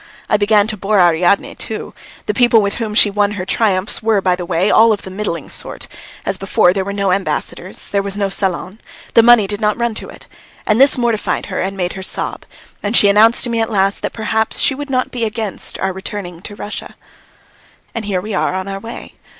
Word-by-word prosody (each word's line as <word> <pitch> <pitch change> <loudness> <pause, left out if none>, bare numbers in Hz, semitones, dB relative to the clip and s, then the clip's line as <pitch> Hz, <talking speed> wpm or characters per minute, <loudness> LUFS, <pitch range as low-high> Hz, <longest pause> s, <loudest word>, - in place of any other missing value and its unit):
I - - +2
began 205 0 +3
to 215 0 -3
bore 205 +1 +1
Ariadne 175 +2 +3
too. 220 - -6 0.3
The 210 - -1
people 240 0 +4
with 200 -1 -1
whom 220 -3 -3
she 210 -2 +5
won 205 0 +1
her 185 -3 -4
triumphs 195 -2 +1
were, 220 -2 +2
by 185 -2 +1
the 180 -1 -6
way, 180 +5 +1
all 225 +1 +6
of 205 - -1
the 190 - -8
middling 185 -6 -4
sort; - - -5 0.4
as 195 -1 -2
before, 185 -2 +3
there 195 0 -1
were 200 - -4
no 200 -1 0
ambassadors, 195 +1 -3
there 200 - +1
was 200 0 -4
no 200 -1 +1
salon, 195 +1 -2 0.3
the 230 - +7
money 235 -2 +6
did 205 +2 -4
not 210 0 +1
run 235 -1 0
to - - -7
it, - - -12 0.4
and 215 +3 +3
this 275 -1 +6
mortified 235 -3 0
her - - -1
and 195 +1 -3
made 180 -1 -2
her 190 - -7
sob, 190 - -3 0.4
and 205 +3 +1
she 200 - +6
announced 220 +3 +5
to 245 - -1
me 230 -1 0
at 225 - -1
last 195 -2 +1
that - - -2
perhaps 220 0 -1
she - - +2
would 290 +1 -6
not 255 -1 0
be 240 -2 -3
against 215 -2 -3
our 190 0 -2
returning 190 -3 -6
to 205 +1 -8
Russia. 205 +1 -7 1.0
And 225 -2 -4
here 190 -3 -1
we 215 +2 -6
are 185 - 0
on 190 +1 -3
our 195 0 -4
way. 225 +3 -9
205 Hz, 225 wpm, -17 LUFS, 190-220 Hz, 1.0 s, the